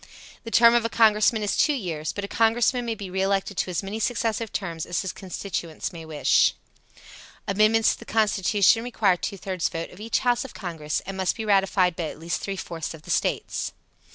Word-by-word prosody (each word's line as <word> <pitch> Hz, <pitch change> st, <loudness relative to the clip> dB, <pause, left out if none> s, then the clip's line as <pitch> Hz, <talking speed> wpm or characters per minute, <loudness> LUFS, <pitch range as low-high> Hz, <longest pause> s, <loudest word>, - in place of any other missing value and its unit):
The 230 Hz, -, -6 dB
term 235 Hz, 0 st, +6 dB
of 240 Hz, -1 st, +3 dB
a 230 Hz, -, -1 dB
Congressman 220 Hz, -1 st, +3 dB
is 205 Hz, -, 0 dB
two 300 Hz, -, +3 dB
years, 165 Hz, -, -3 dB
but 205 Hz, -, -5 dB
a -, -, -7 dB
Congressman 235 Hz, +3 st, +2 dB
may 230 Hz, -1 st, -2 dB
be 195 Hz, -3 st, -8 dB
re 190 Hz, +1 st, -1 dB
elected 195 Hz, +1 st, 0 dB
to -, -, 0 dB
as 180 Hz, +2 st, -2 dB
many 200 Hz, +3 st, -4 dB
successive 225 Hz, -1 st, -1 dB
terms 165 Hz, -5 st, -4 dB
as 175 Hz, +1 st, -1 dB
his 190 Hz, -, -4 dB
constituents 180 Hz, -3 st, -5 dB
may 165 Hz, -1 st, -8 dB
wish. 155 Hz, -2 st, +3 dB, 0.9 s
Amendments 215 Hz, +2 st, +3 dB
to -, -, -11 dB
the -, -, -11 dB
Constitution 210 Hz, 0 st, +3 dB
requires 210 Hz, -7 st, +1 dB
two 200 Hz, -, -3 dB
thirds 185 Hz, -2 st, -2 dB
vote 165 Hz, 0 st, -5 dB
of 180 Hz, -, -14 dB
each 225 Hz, +2 st, -1 dB
house 245 Hz, -1 st, +2 dB
of 265 Hz, -, -10 dB
Congress 160 Hz, -6 st, -3 dB
and 195 Hz, +1 st, -6 dB
must 190 Hz, -1 st, 0 dB
be 225 Hz, -, -5 dB
ratified 195 Hz, -3 st, +3 dB
by 170 Hz, -, -3 dB
at 155 Hz, -, -6 dB
least 165 Hz, +1 st, -3 dB
three 195 Hz, -, -3 dB
fourths 165 Hz, -3 st, -5 dB
of 155 Hz, -, -15 dB
the -, -, -6 dB
States. -, -, -1 dB
200 Hz, 210 wpm, -25 LUFS, 180-225 Hz, 0.9 s, term